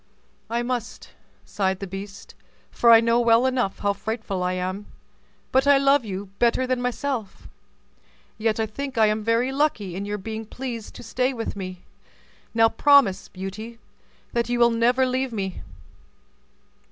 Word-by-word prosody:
"I 235 +1 -1
must," 240 -2 -4 0.3
sighed 190 -2 -1
the 195 - -4
beast, 195 +1 -9 0.4
"for 235 - +3
I 225 -1 +9
know 230 +1 +3
well 235 +1 +4
enough 250 -7 0
how 200 0 0
frightful 220 -2 -4
I 180 0 0
am; 185 +3 -4 0.6
but 265 +2 +3
I 285 -1 +7
love 275 0 +4
you 195 -2 -6
better 240 +2 +2
than 255 -1 -1
myself. 250 -3 -3 0.9
Yet 220 0 0
I 220 - +1
think 265 +4 -6
I 220 - +6
am 215 0 0
very 230 +4 +1
lucky 270 - 0
in 195 +2 -4
your 205 0 -3
being 220 +2 -6
pleased 240 -2 -6
to - - -10
stay 255 +2 -1
with 230 -3 -4
me; 185 -2 -7 0.7
now 225 0 +5
promise, 225 -7 +4
Beauty, 205 +5 -7 0.6
that 235 -1 0
you 245 - 0
will 235 0 +5
never 245 +3 +3
leave 255 0 -1
me. 195 -4 -4
230 Hz, 160 wpm, -24 LUFS, 200-250 Hz, 0.9 s, I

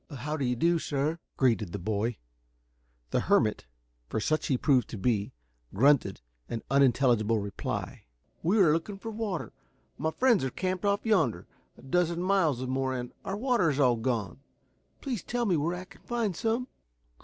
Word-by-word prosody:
"How 145 +1 -4
do 145 - -2
you 125 -1 +1
do, 170 +7 +2
sir!" 150 +3 -1 0.2
greeted 115 -8 +1
the - - -2
boy. 110 +4 -1 0.9
The - - +2
hermit, - - +2 0.4
for - - -1
such 155 +8 0
he 130 - +2
proved 130 -2 +2
to 115 - -6
be, 105 0 0 0.4
grunted 125 - +3 0.3
an 115 - -4
unintelligible 120 -5 +3
reply. 100 -1 -4 0.4
"We 180 +7 +2
are 175 -7 +5
looking 170 +5 -2
for 225 +3 -6
water. 210 -6 -4 0.5
My 160 - 0
friends 235 - +3
are 130 - 0
camped 185 +6 -2
off 200 +1 +1
yonder, 160 - +2 0.3
a - - -16
dozen 170 +4 +1
miles 175 -9 +2
or - - -4
more, 130 0 -1
and 125 -1 -5
our 195 - -3
water 235 -7 +2
is 145 -1 -1
all 125 -4 +4
gone. 110 -4 -2 0.6
Please 250 - -3
tell 245 -1 -2
me 190 -5 +2
where 165 +3 0
I 185 +1 -7
can - - -18
find 230 -6 -2
some?" 230 +5 -1
150 Hz, 175 wpm, -29 LUFS, 120-185 Hz, 0.9 s, are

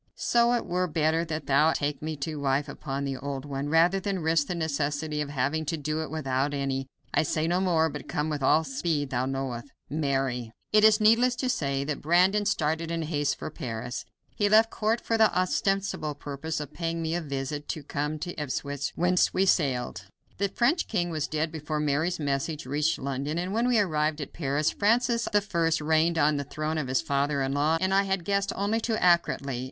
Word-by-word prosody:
So 235 0 +3
it 240 - 0
were 180 +1 0
better 160 0 +1
that 155 -3 -4
thou 150 +4 +4
take 145 -1 -2
me 155 0 -3
to 155 -2 -5
wife 140 +1 0
upon 140 0 -4
the 135 -1 -3
old 135 +1 -5
one, 140 0 -3
rather 170 +5 +4
than 195 -3 -2
risk 160 -2 +2
the 180 - -2
necessity 150 -1 -1
of 145 - -3
having 145 +3 -1
to 160 +2 -2
do 155 +1 -2
it 160 - -5
without 140 -2 -1
any. 135 -1 -2 0.3
I - - +4
say 155 0 0
no 175 +2 +1
more, 165 -4 +3
but 150 -1 -7
come 150 +1 -1
with 150 -2 -3
all 155 +4 +4
the 150 - -8
speed 145 0 -1
thou 125 0 0
knowest. 135 -2 -3 0.2
"MARY." 135 -6 -1 0.2
It 215 0 +6
is 215 0 +6
needless 230 +4 +4
to 255 +1 -2
say 140 - 0
that 145 0 -3
Brandon 185 +6 +3
started 160 -2 0
in 165 -1 -2
haste 145 -2 -1
for - - -6
Paris. 120 0 -5 0.3
He 205 -1 +2
left 220 +2 +5
court 225 +2 0
for 225 -1 -1
the 220 - +6
ostensible 185 -4 0
purpose 145 +2 -4
of 150 -2 -7
paying 165 -1 -3
me 160 0 -1
a 175 - -1
visit 145 0 -4
and 145 -2 -11
came 150 +2 -2
to 175 +3 -5
Ipswich, 140 0 -3
whence 180 +1 +2
we 190 - +3
sailed. 130 - 0 0.3
The 200 0 +1
French 260 - +1
king 175 -5 -1
was 155 -2 -2
dead 155 +1 -1
before 155 -1 -3
Mary's 150 +4 0
message 145 +1 -2
reached 150 +4 0
London, 140 +3 -3
and 180 +3 -2
when 230 +3 +1
we 245 -2 +3
arrived 155 -6 +1
at 145 - -6
Paris, 145 -1 0
Francis 235 +2 +2
I 185 -6 +1
reigned 160 +2 +2
on 150 -1 +3
the 140 - -2
throne 155 +3 -3
of 145 - -3
his 130 0 +1
father 140 0 0
in 135 +1 -1
law. 150 +3 +2
I 190 +2 +3
had 190 -3 -1
guessed 200 0 0
only 205 +3 0
too 225 0 0
accurately. 170 - +2
155 Hz, 210 wpm, -27 LUFS, 140-180 Hz, 0.3 s, It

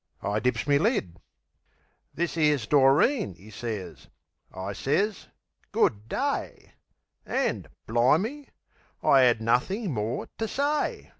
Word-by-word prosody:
I 105 +2 0
dips 125 +4 0
me 140 -1 +3
lid. 155 - 0 0.9
"This 170 +1 -2
'ere's 150 -7 +2
Doreen," 145 - +3
'e 105 +4 -15
sez. 105 -4 -6 0.4
I 95 +2 -5
sez 195 - -1 0.4
"Good 105 +2 +1
day." - - -3 0.5
An', - - -1 0.2
bli'me, 165 - +1 0.5
I 135 -2 +6
'ad 120 -2 +3
nothin' 150 - 0
more 110 +1 -3
ter 225 - -1
say! 285 +5 -1
135 Hz, 115 wpm, -27 LUFS, -, 0.9 s, I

